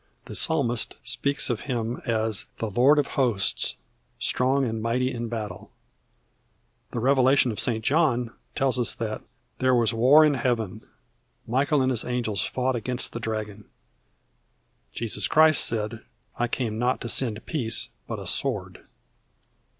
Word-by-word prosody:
The - - -9
psalmist 125 -8 +1
speaks 140 +4 +1
of 115 - -2
Him 120 -1 -2
as 110 -3 0
"The 110 -2 -3
Lord 130 +8 +5
of 145 - +3 0.2
Hosts, 110 -7 +1 0.4
strong 135 +2 +1
and 110 -2 -3
mighty 125 +3 0
in 120 -1 -4
battle." 110 -5 -6 1.2
The 120 - -4
Revelation 130 0 +4
of 105 - -5
St. 110 -2 -1
John 130 -7 +2 0.2
tells 130 -2 +1
us 120 - -1
that 110 -2 -4 0.4
"There 130 -1 +3
was 115 -1 +2
war 135 +7 +6
in 150 - +3
Heaven; 115 -6 -1 0.6
Michael 135 +4 +1
and 130 - +1
his 120 -3 +1
angels 115 -6 -1
fought 130 0 -1
against 125 +2 -3
the 120 - -4
dragon." 110 -2 -5 1.3
Jesus 115 -2 -2
Christ 155 -1 +5
said: 110 0 -2 0.3
"I 120 - 0
came 115 -3 -2
not 125 +1 +1
to - - -4
send 115 -2 0
peace, 120 -8 0 0.2
but - - -4
a - - -8
sword." - - -2
120 Hz, 145 wpm, -25 LUFS, 110-130 Hz, 1.3 s, war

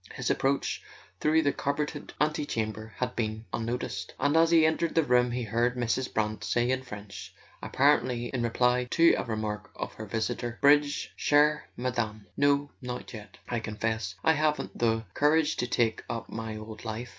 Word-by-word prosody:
His - - -1
approach 135 +1 0 0.4
through 160 +1 +3
the 145 - +2
carpeted 145 +1 -3
antechamber 110 - -2
had 125 0 -2
been 110 -1 -2
unnoticed, 120 +2 -3
and 145 +2 +2
as 165 0 +5
he 165 -2 +6
entered 160 +1 +1
the 165 - +4
room 125 -2 +3
he 125 0 -2
heard 120 +3 +1
Mrs. 125 +1 -1
Brant 110 0 -1
say 120 +1 +1
in 130 0 0
French, 105 -5 -9 0.3
apparently 130 -4 +2
in 125 - -1
reply 125 +1 +2
to 165 +4 +5
a - - -2
remark 110 -2 -4
of - - -5
her 110 - -8
visitor: 120 +2 -2
"Bridge, 145 0 +3
chere 150 +1 +3
Madame? 120 -4 -2
No; 145 0 +2
not 125 0 -6
yet. 105 -1 -10
I 120 - -1
confess 110 -3 -3
I 160 - +5
haven't 150 0 0
the 115 -1 +1
courage 155 +1 +3
to 125 - -1
take 115 -2 +1
up 115 - -4
my 110 -1 -5
old 110 0 -9
life. 115 +2 -5
125 Hz, 170 wpm, -28 LUFS, 110-145 Hz, 0.4 s, he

